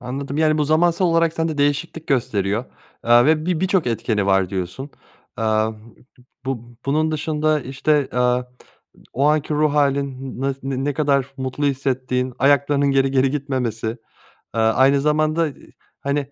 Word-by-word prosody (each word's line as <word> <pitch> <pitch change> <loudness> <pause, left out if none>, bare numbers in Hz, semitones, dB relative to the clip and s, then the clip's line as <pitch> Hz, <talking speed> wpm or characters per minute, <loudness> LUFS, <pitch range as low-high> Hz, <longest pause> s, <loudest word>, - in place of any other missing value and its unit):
Anladım. 135 +3 -5
Yani, 155 -1 +3
bu 150 - +2
zamansal 170 +4 +2
olarak 165 -1 +2
sende 160 -2 -2
değişiklik 145 +3 -1
gösteriyor. 110 -5 0 0.4
Eee, 120 +1 +6
ve 155 +1 +2
bi 180 -3 0
birçok 190 -5 +1
etkeni 110 -3 -1
var 95 -2 +2
diyorsun. 95 +9 -5 0.5
Eee, 115 - -1 1.0
bu 120 -2 -5
bunun 155 +3 +1
dışında 155 0 0
işte, 135 +2 0
eee, 125 0 +1 0.7
o 135 +3 +1
anki 150 0 +1
ruh 150 0 +2
hâlin 140 -3 -1
ne 135 -1 -2
ne 145 - 0
kadar 140 -2 +1
mutlu 130 +2 -3
hissettiğin 130 -2 -1
ayaklarının 140 +1 +3
geri 135 0 +2
geri 130 0 +2
gitmemesi, 130 -6 -2
eee, 115 +1 -9 0.4
aynı 130 +5 +4
zamanda, 155 +2 +1
eee, 140 - -14 0.3
hani, 140 +1 -1
140 Hz, 145 wpm, -21 LUFS, 125-150 Hz, 1.0 s, Eee